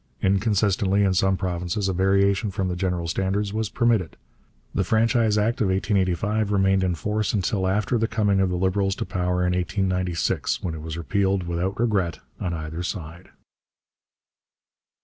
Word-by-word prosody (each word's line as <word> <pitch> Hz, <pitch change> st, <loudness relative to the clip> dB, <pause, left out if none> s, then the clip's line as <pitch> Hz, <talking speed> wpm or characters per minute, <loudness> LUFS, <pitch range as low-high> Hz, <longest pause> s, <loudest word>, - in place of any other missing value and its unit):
Inconsistently, 100 Hz, 0 st, +2 dB
in 95 Hz, -1 st, +2 dB
some 95 Hz, +1 st, +2 dB
provinces 90 Hz, +2 st, -2 dB
a 95 Hz, -, 0 dB
variation 100 Hz, +3 st, +2 dB
from 95 Hz, -2 st, -2 dB
the 90 Hz, -, -2 dB
general 90 Hz, -2 st, -2 dB
standards 100 Hz, +4 st, -1 dB
was 110 Hz, -1 st, -1 dB
permitted. 110 Hz, -7 st, +1 dB, 0.6 s
The -, -, +1 dB
Franchise 115 Hz, -1 st, +2 dB
Act 110 Hz, +3 st, +1 dB
of 105 Hz, -, +3 dB
1885 100 Hz, +2 st, 0 dB
remained 95 Hz, -1 st, +3 dB
in 90 Hz, -2 st, 0 dB
force 105 Hz, +5 st, -1 dB
until 95 Hz, -1 st, 0 dB
after 105 Hz, +5 st, +1 dB
the 115 Hz, -, +1 dB
coming 105 Hz, -4 st, +1 dB
of 95 Hz, -1 st, +2 dB
the 90 Hz, -, -1 dB
Liberals 95 Hz, +1 st, +1 dB
to -, -, -4 dB
power 90 Hz, -1 st, -1 dB
in 90 Hz, -, +1 dB
1896, 90 Hz, -1 st, -1 dB
when 85 Hz, -, -2 dB
it 80 Hz, -, -7 dB
was 80 Hz, 0 st, -6 dB
repealed 95 Hz, +2 st, 0 dB
without 90 Hz, +4 st, -2 dB
regret 100 Hz, -8 st, +1 dB, 0.2 s
on 90 Hz, -, -2 dB
either 80 Hz, 0 st, -5 dB
side. 85 Hz, -1 st, -6 dB
95 Hz, 160 wpm, -24 LUFS, 90-105 Hz, 0.6 s, of